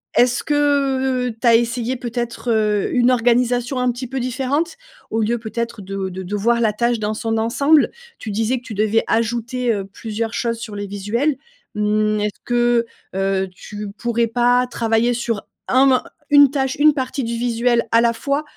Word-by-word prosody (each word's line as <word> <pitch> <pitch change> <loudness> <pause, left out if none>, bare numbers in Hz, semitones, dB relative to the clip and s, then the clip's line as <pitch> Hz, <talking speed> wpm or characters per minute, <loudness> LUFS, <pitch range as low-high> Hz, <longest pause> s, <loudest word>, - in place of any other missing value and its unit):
est-ce 245 0 +3
que 270 -3 +1
tu 230 +1 -7
as 230 - +7
essayé 240 +2 0
peut-être, 240 0 -4
heu, 210 -2 +1
une 245 0 +4
organisation 245 +1 +1
un 250 0 +2
petit 250 +2 -6
peu 265 +1 -3
différente? 270 - -1 0.3
Au 225 - 0
lieu, 235 +3 +1
peut-être, 235 0 -4
de 195 0 -4
de 190 0 -6
de 190 +3 -4
voir 235 +3 +2
la 220 -2 +3
tâche 235 +2 0
dans 215 0 -1
son 225 +1 -2
ensemble, 280 +7 +3 0.3
tu 215 - -6
disais 225 +5 0
que - - -25
tu 225 -4 -8
devais 215 +2 +2
ajouter, 235 +2 0
heu, 200 -2 -2
plusieurs 220 +3 -5
choses 230 -1 -1
sur 225 -2 -7
les 205 0 -4
visuels, 215 +9 -1 0.4
mmh, 215 0 +1
est-ce 210 -1 -3
que, 240 -1 +2 0.3
heu, 195 0 0
tu 205 +2 -8
pourrais 235 0 0
pas 245 +2 +2
travailler 230 0 +1
sur 230 -3 -2 0.2
un 260 +2 +4
mo 265 -1 +5 0.4
1 285 -1 +8
tâche, 270 -1 -1
1 300 0 +5
partie 265 0 -2
du 235 0 -3
visuel 235 0 +1
à 230 - +5
la 235 0 +3
fois, 280 +5 -1
235 Hz, 185 wpm, -20 LUFS, 220-250 Hz, 0.4 s, 1